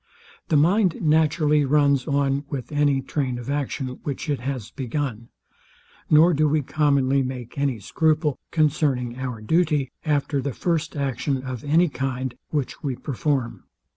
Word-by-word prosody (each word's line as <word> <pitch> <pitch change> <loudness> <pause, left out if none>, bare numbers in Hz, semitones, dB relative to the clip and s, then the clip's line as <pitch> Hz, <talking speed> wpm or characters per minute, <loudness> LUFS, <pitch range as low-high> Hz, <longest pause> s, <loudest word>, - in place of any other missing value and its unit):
The 155 - +4
mind 180 +4 +3
naturally 150 -1 +3
runs 140 -1 +2
on 140 0 +1
with 135 -2 -5
any 145 -2 +2
train 130 -3 -2
of 120 +3 -5
action, 135 -2 -3
which 145 +2 -4
it 140 - -1
has 125 -3 -4
begun; 125 -3 -4 0.8
nor 160 +3 +6
do 155 0 +3
we 150 0 +1
commonly 140 -2 +2
make 125 -2 -5
any 140 -5 -1
scruple 155 - +1
concerning 135 -6 +1
our 125 -4 -4
duty, 150 +1 +1
after 145 -2 0
the 140 0 -3
first 170 - -1
action 135 0 -1
of 130 -1 -5
any 160 +5 +3
kind, 130 -3 -3 0.2
which 145 -4 -3
we 135 -4 -2
perform. 135 -1 -2
140 Hz, 145 wpm, -24 LUFS, 130-150 Hz, 0.8 s, nor